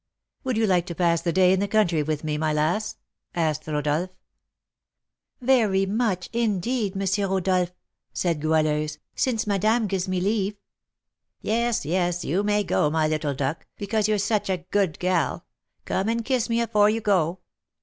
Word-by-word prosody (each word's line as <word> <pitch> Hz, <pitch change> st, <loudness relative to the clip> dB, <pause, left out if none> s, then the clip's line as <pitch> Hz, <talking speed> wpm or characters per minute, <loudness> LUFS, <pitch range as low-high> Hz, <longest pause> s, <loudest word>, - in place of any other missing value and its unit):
"Would 255 Hz, -3 st, -1 dB
you 225 Hz, -, +3 dB
like 180 Hz, -3 st, +2 dB
to 170 Hz, -, -5 dB
pass 170 Hz, -2 st, +2 dB
the 170 Hz, -, 0 dB
day 185 Hz, +1 st, +4 dB
in 190 Hz, -, +1 dB
the 200 Hz, -, 0 dB
country 195 Hz, -7 st, +2 dB
with 150 Hz, 0 st, -2 dB
me, 155 Hz, -1 st, -1 dB
my 155 Hz, 0 st, 0 dB
lass?" 175 Hz, +9 st, 0 dB, 0.4 s
asked 155 Hz, -3 st, -1 dB
Rodolph. 150 Hz, +3 st, 0 dB, 1.3 s
"Very 225 Hz, -7 st, +3 dB
much, 195 Hz, -3 st, -1 dB
indeed, 220 Hz, -2 st, 0 dB
M. 195 Hz, 0 st, 0 dB
Rodolph," 185 Hz, -2 st, +1 dB, 0.4 s
said 170 Hz, -4 st, -1 dB
Goualeuse, 155 Hz, -1 st, +1 dB, 0.2 s
"since 230 Hz, -4 st, 0 dB
madame 215 Hz, +3 st, +2 dB
gives 190 Hz, -2 st, -2 dB
me 185 Hz, -1 st, 0 dB
leave." 205 Hz, +1 st, 0 dB, 0.8 s
"Yes, 235 Hz, -3 st, 0 dB
yes, 175 Hz, +2 st, 0 dB
you 175 Hz, +7 st, +1 dB
may 205 Hz, 0 st, +1 dB
go, 150 Hz, -5 st, +1 dB
my 155 Hz, 0 st, +1 dB
little 155 Hz, -2 st, -1 dB
duck, 140 Hz, +4 st, -3 dB
because 210 Hz, +1 st, 0 dB
you're 215 Hz, -1 st, +2 dB
such 205 Hz, 0 st, 0 dB
a 180 Hz, -2 st, -2 dB
good 195 Hz, -6 st, +1 dB
gal. 180 Hz, -1 st, 0 dB, 0.4 s
Come 195 Hz, +3 st, -1 dB
and 230 Hz, 0 st, -1 dB
kiss 255 Hz, -2 st, 0 dB
me 230 Hz, 0 st, +1 dB
afore 210 Hz, -2 st, +3 dB
you 225 Hz, +1 st, 0 dB
go." 185 Hz, -4 st, +1 dB
190 Hz, 165 wpm, -25 LUFS, 165-215 Hz, 1.3 s, day